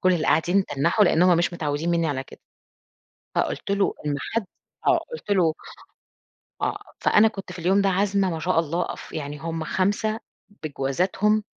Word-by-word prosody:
كل 185 0 +4
اللي 165 -3 0
قاعدين 185 +4 +3
تنّحوا، 170 +9 +2
لإن 170 -1 +3
هم 180 -1 +5
مش 175 +1 +1
متعوّدين 155 0 -2
منّي 170 -1 +2
على 135 -2 -2
كده، - - -15 1.0
فقُلت - - -1
له: 200 0 +2
"إن 145 -1 0
حد" 225 +5 -2 0.4
آه. - - +6
قُلت 475 - -8
له 170 -5 +3 1.1
آه. - - 0 0.2
فأنا 220 +1 +5
كنت 195 -3 -8
في 185 - -10
اليوم 185 +4 +3
ده 195 - +3
عازمة 195 0 +1
ما 165 - -3
شاء 180 +1 +1
الله 165 +2 -1
ف - - -11
يعني 145 -1 -5
هم 165 0 -4
5 205 +6 0 0.4
بجوازاتهم، 185 +9 0
175 Hz, 170 wpm, -24 LUFS, 160-195 Hz, 1.1 s, آه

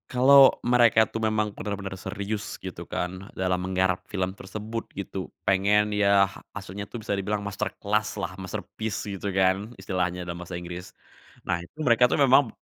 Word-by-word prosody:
Kalau 135 +2 +7
mereka 120 -2 +5
tuh 110 - -5
memang 110 -1 0
bener-bener 100 -2 -5
serius 105 +2 -4
gitu - - -8
kan, 90 +2 -4
dalam 90 -1 0
menggarap 95 -1 +1
film 95 -2 -2
tersebut 110 +3 -6
gitu, 95 -2 -5 0.2
pengen 105 +2 +3
ya, 100 -1 +5 0.3
maksudnya 100 0 -7
tuh - - -6
bisa 100 - -2
dibilang 100 +1 -1
masterclass-lah, 105 0 -2
masterpiece 105 +3 -5
gitu 100 -1 -4
kan, 95 +3 +1
istilahnya 90 -2 -2
dalam 85 0 -6
bahasa 90 0 -6
Inggris. 90 +1 -7 0.5
Nah, 85 - 0
itu 85 - -15
mereka 125 0 +5
tuh - - +1
memang 135 -2 +5
b - - -11
100 Hz, 155 wpm, -26 LUFS, 95-110 Hz, 0.5 s, Kalau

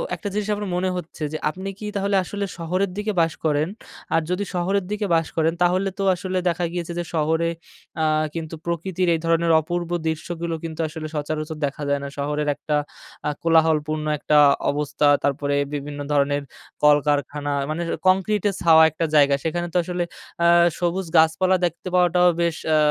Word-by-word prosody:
একটা 205 - -7
জিনিস 210 0 -2
আপনার 205 -2 -4
মনে 185 +1 0
হচ্ছে 160 -2 -7
যে, - - -1
আপনি 190 +4 -6
কি 210 - -6
তাহলে 200 0 0
আসলে 200 +2 -4
শহরের 180 +4 -1
দিকে 210 +1 -1
বাস 165 -1 +1
করেন? 150 +1 +2 0.5
আর 165 - +3
যদি 180 +3 0
শহরের 190 +2 0
দিকে 210 0 -1
বাস 165 -1 +1
করেন, 160 +1 +2
তাহলে 185 +2 +2
তো - - 0
আসলে 185 +1 -3
দেখা 175 +1 -1
গিয়েছে 170 -1 -4
যে, - - -1
শহরে 160 +2 +1 0.5
আ - - +3 0.3
কিন্তু 165 0 -5
প্রকৃতির 175 +2 -1
এই - - -2
ধরনের 165 0 +2
অপূর্ব 175 +2 -3 0.2
দৃশ্যগুলো 165 +1 -3
কিন্তু 160 0 -6
আসলে 155 0 -6
সচরাচর 155 +1 -3
দেখা 140 +1 -5
যায় 140 0 +1
না। 140 - -4
শহরের 150 +1 -2
একটা 150 - -2 0.5
আ - - +2
কোলাহলপূর্ণ 155 -2 +2
একটা 150 +1 +2 0.3
অবস্থা, 145 0 0 0.2
তারপরে 140 0 0 0.2
বিভিন্ন 145 0 -5
ধরনের 145 0 +1 0.4
কলকারখানা, 145 0 +2 0.2
মানে 160 +3 -2 0.3
কংক্রিট 195 +2 +2
এ - - -1
ছাওয়া 160 -2 +7
একটা 165 +2 -2
জায়গা। 140 -1 +5
সেখানে 175 +2 -2
তো - - +2
আসলে 180 0 -2 0.4
আ - - +6 0.3
সবুজ 175 +1 -1
গাছপালা 160 +4 +4
দেখতে 170 +2 -4
পাওয়াটাও 180 0 +4
বেশ 170 -1 +1 0.2
আ - - +5
165 Hz, 175 wpm, -23 LUFS, 150-180 Hz, 0.5 s, ছাওয়া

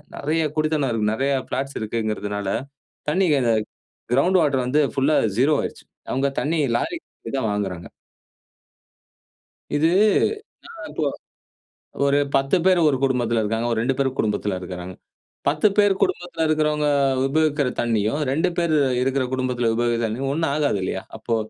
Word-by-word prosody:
நெறைய 160 +3 0
குடித்தனம் 155 -3 +1
இருக்குது, 110 -2 0
நெறைய 135 +4 0
ஃபிளாட்ஸ் 135 +2 -3
இருக்குங்கிறனால 105 -2 -3 0.6
தண்ணீய, 160 -3 +2 0.7
கிரவுண்ட் 180 +9 +4
வாட்டர் 135 -5 +1
வந்து 135 +5 +2 0.2
புல்லா 140 +3 +3 0.2
ஸீரோ 140 +5 +4
ஆயிருச்சு. - - -6 0.3
அவங்க 135 +2 +1
தண்ணீர் 150 -5 0
லாரில 340 -1 -3 0.3
தா - - 0
வாங்குறாங்க. 95 -4 -3 1.9
இது 150 +2 +3 1.0
இப்போ - - -2 1.0
ஒரு 140 0 +3 0.2
10 135 +5 +2
பேர் 185 -2 +5
ஒரு 135 - +1
குடும்பத்தில 120 -4 +1
இருக்காங்க. 115 +2 -1
ஒரு 115 - 0
2 130 +3 0
பேர் 135 -1 -1
குடும்பத்தில 105 -2 0
இருக்காங்க. 90 0 -7 0.5
10 150 +7 +3
பேர் 205 -1 +5
குடும்பத்தில 175 -2 -1
இருக்கிறவங்க 150 -1 +1 0.4
உபயோகிக்கிற 150 -1 +1
தண்ணீயும், 115 +3 0
2 160 +6 +1
பேர் 170 -2 +1 0.3
இருக்கிற 135 0 +1
குடும்பத்தில 125 -3 0
உபயோகிக்க 120 0 +1
தண்ணியும் 130 +5 -2
ஒண்ணா 160 +1 0
ஆகாது 145 -9 +1
இல்லையா? 95 0 -3
அப்போ 115 +1 -2
135 Hz, 130 wpm, -22 LUFS, 115-150 Hz, 1.9 s, பேர்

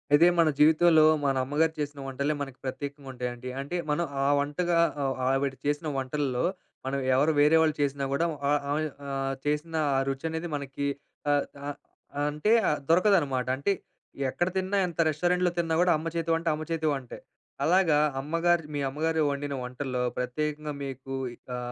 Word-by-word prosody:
అదే 170 +4 +6
మన 165 -2 +5
జీవితంలో 160 +1 +6 0.2
మన 135 -1 +2
అమ్మగారు 155 +3 +1
చేసిన 145 -1 -3
వంటలే 140 +3 -1
మనకు 135 -2 -5
ప్రత్యేకంగా 140 +1 -5
ఉంటాయండి. 125 0 -5
అంటే 145 +6 -5
మనం 150 +3 +1 0.2
ఆ - - +3
వంటగా 170 +5 0 0.3
ఆ - - 0 0.2
ఆవిడ 135 0 +1
చేసిన 145 +2 0
వంటల్లో, 135 -1 -1 0.4
మనం 135 +1 -1 0.2
ఎవరు 145 +4 +3
వేరే 150 +2 +6
వాళ్ళు 155 -2 +2
చేసినా 140 -1 0
కూడా 165 +5 +1 0.2
ఆ - - +3 0.2
ఆమె 150 +2 +1 0.2
ఆహ్, 135 0 -2
చేసిన 150 +2 -1 0.2
ఆ - - +3
రుచి 135 +3 -4
అనేది 160 +2 -4
మనకి 140 0 -3 0.4
అ - - +5 0.3
అ - - -1 0.6
అంటే 150 +8 0 0.2
ఆహ్, 150 - 0
దొరకదు 185 +4 +5
అన్నమాట. 130 -4 -2
అంటే 140 +9 0 0.6
ఎక్కడ 175 +6 0
తిన్నా 190 +2 0
ఎంత 170 -1 -9
రెస్టారెంట్‌లో 180 +3 +1
తిన్నా 165 -1 0
కూడా 180 0 +4
అమ్మ 160 +2 -5
చేతి 165 0 -1
వంట, 165 +1 -4
అమ్మ 155 +1 -6
చేతి 160 -1 0
వంటే. 135 -3 -6 0.5
అలాగా 170 -4 +4 0.2
అమ్మగారు 165 +3 +1
మీ - - -1
అమ్మగారు 160 +3 0
వండిన 140 0 -3
వంటల్లో, 125 0 -3 0.2
ప్రత్యేకంగా 150 +4 -2
మీకు 135 0 -7 0.2
ఇంకా 125 0 -7
150 Hz, 165 wpm, -28 LUFS, 135-165 Hz, 0.6 s, అదే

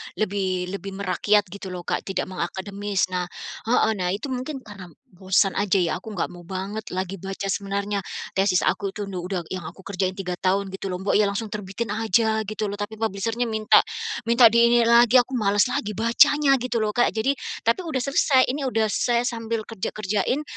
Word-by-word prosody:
lebih 185 -3 -1
lebih 195 0 -5
merakyat 200 +2 +2
gitu 200 0 -8
lho, 180 -1 -6
Kak, - - -2
tidak 190 -1 -2
mengakademis. 195 +2 -2
Nah 180 -1 -1 0.4
heeh, 230 -1 +3
nah 180 -1 0
itu 215 +8 -4
mungkin 260 +2 -4
karena 200 -4 -10 0.3
bosan 190 +1 +2
aja 200 -1 +2
ya, 170 -3 +1
aku 220 - -9
nggak 175 - -1
mau 175 0 -12
banget 195 +5 -5
lagi 185 +1 -3
baca 195 +2 -5
sebenarnya 200 +1 -2 0.4
tesis 190 -1 +3
aku 200 -1 0
itu 205 0 -5
nu 185 -3 -5
udah 180 -1 -3
yang 185 -2 -5
aku 165 +4 -9
kerjain 185 -1 -1
3 180 -2 -4
tahun 195 +1 +1
gitu 195 +1 -5
lho, 180 - -3
mbok 200 - +1
ya 210 - +4
langsung 200 +2 -3
terbitin 210 +2 -4 0.5
gitu 215 +1 -3
loh, 200 - -4
tapi 205 +2 -5
publisher-nya 225 +3 -1
minta 220 -1 +5 0.5
minta 235 +1 +6
di 235 +1 +5
ini 240 0 +5
lagi, 235 +1 +6
aku 250 +1 +3
malas 205 -2 +3
lagi 210 -3 -2
bacanya 275 +6 +4
gitu 250 -1 -1
loh, 210 - 0
Kak, 240 - +4
jadi 225 +5 +2 0.3
tapi 230 +7 +3
sudah 285 -6 -2
selesai, 275 -1 +3
ini 285 +3 -4
sudah 225 -3 +1
saya 240 +1 +1
sambil 230 -2 -2
kerja 220 -4 -5
kerjain, 215 +7 0
205 Hz, 195 wpm, -24 LUFS, 190-230 Hz, 0.5 s, minta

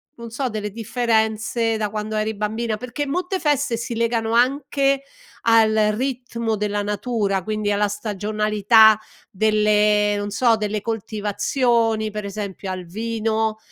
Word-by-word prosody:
non 235 -1 -9
so 255 +3 -2
delle 215 -3 -4
differenze 225 0 0
da 215 -1 -1
quando 215 +1 -4
eri 215 +1 -1
bambina 215 +2 -2
perché 250 +5 -4
molte 360 +5 -2
feste 290 -7 +1
si 235 +1 -4
legano 230 -1 0
anche 275 +2 +2 0.4
al 225 -1 +5 0.2
ritmo 235 -3 -2
della 205 0 -2
natura, 205 -1 -1
quindi 215 +1 -2
alla 205 0 +2
stagionalità 210 +1 +3 0.3
delle, 210 0 +3
non 205 0 -3
so, 230 +2 +3
delle 210 -1 -2
coltivazioni, 225 +1 0
per 210 -1 -5
esempio 200 -1 -5
al 185 -1 -5
vino 220 +2 -2
220 Hz, 130 wpm, -22 LUFS, 210-235 Hz, 0.4 s, al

